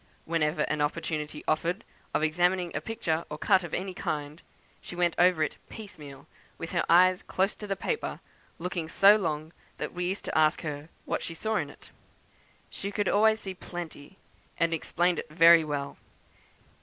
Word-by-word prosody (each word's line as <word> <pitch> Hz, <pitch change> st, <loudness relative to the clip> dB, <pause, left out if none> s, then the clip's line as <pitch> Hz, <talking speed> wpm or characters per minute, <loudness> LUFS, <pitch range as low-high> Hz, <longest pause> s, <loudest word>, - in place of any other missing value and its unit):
Whenever 160 Hz, -1 st, +1 dB
an 150 Hz, -1 st, -1 dB
opportunity 150 Hz, 0 st, -2 dB
offered 170 Hz, +6 st, 0 dB, 0.3 s
of -, -, 0 dB
examining 175 Hz, +2 st, +1 dB
a -, -, -1 dB
picture 170 Hz, -8 st, -2 dB
or 150 Hz, -, -5 dB
cut 190 Hz, +2 st, +3 dB
of 170 Hz, -, -7 dB
any 190 Hz, 0 st, -3 dB
kind, 150 Hz, -1 st, -4 dB, 0.4 s
she -, -, -9 dB
went 175 Hz, -1 st, +2 dB
over 175 Hz, -3 st, +5 dB
it 150 Hz, -, -3 dB
piecemeal, 150 Hz, -, -10 dB, 0.3 s
with 165 Hz, -, -6 dB
her -, -, +1 dB
eyes 185 Hz, +2 st, +6 dB
close 190 Hz, +2 st, 0 dB
to 210 Hz, -, -8 dB
the 195 Hz, -, -1 dB
paper, 460 Hz, -, -3 dB, 0.4 s
looking 170 Hz, -2 st, -4 dB
so 200 Hz, +4 st, +7 dB
long 160 Hz, -5 st, -2 dB, 0.2 s
that -, -, -4 dB
we 180 Hz, 0 st, -2 dB
used 190 Hz, +3 st, -3 dB
to -, -, -4 dB
ask 155 Hz, +1 st, +3 dB
her 150 Hz, 0 st, -5 dB, 0.2 s
'what -, -, -1 dB
she 165 Hz, -, -6 dB
saw 220 Hz, +6 st, -2 dB
in 145 Hz, -5 st, -2 dB
it.' -, -, -16 dB, 0.8 s
She 200 Hz, -, -5 dB
could 205 Hz, -1 st, -1 dB
always 220 Hz, +1 st, +4 dB
see 190 Hz, -, -5 dB
plenty, 175 Hz, -2 st, -8 dB, 0.4 s
and 170 Hz, -1 st, +2 dB
explained 175 Hz, +2 st, +1 dB
it -, -, -7 dB
very 165 Hz, +1 st, +7 dB
well. 145 Hz, -2 st, -4 dB
170 Hz, 175 wpm, -28 LUFS, 155-185 Hz, 0.8 s, so